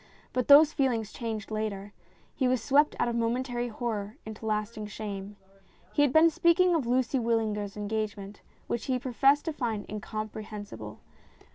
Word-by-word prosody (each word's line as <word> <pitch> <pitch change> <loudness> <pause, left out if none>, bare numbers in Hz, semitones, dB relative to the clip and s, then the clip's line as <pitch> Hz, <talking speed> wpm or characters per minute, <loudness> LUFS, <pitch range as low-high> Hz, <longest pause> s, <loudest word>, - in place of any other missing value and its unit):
But 255 -2 0
those 295 +2 +8
feelings 240 -7 0
changed 225 -3 -5
later. 205 -2 -3 0.4
He 260 - 0
was 255 0 +2
swept 290 +4 +3
out - - +1
of 235 - -1
momentary 240 +1 -1
horror 220 -1 -4
into 220 0 -7
lasting 215 0 -2
shame. 205 -1 -6 0.6
He - - +2
had 290 -3 +4
been 320 +3 +6
speaking 345 +3 +4
of 300 -8 0
Lucy 255 +1 +1
Wyllinger's 220 -3 -1
engagement, 210 -1 -4 0.2
which 235 - -3
he 260 -2 0
professed 270 +3 +2
to 325 - -2
find 225 -7 -3
incompre 215 +1 -5
hensible. 205 -1 -8
230 Hz, 155 wpm, -28 LUFS, 210-260 Hz, 0.6 s, those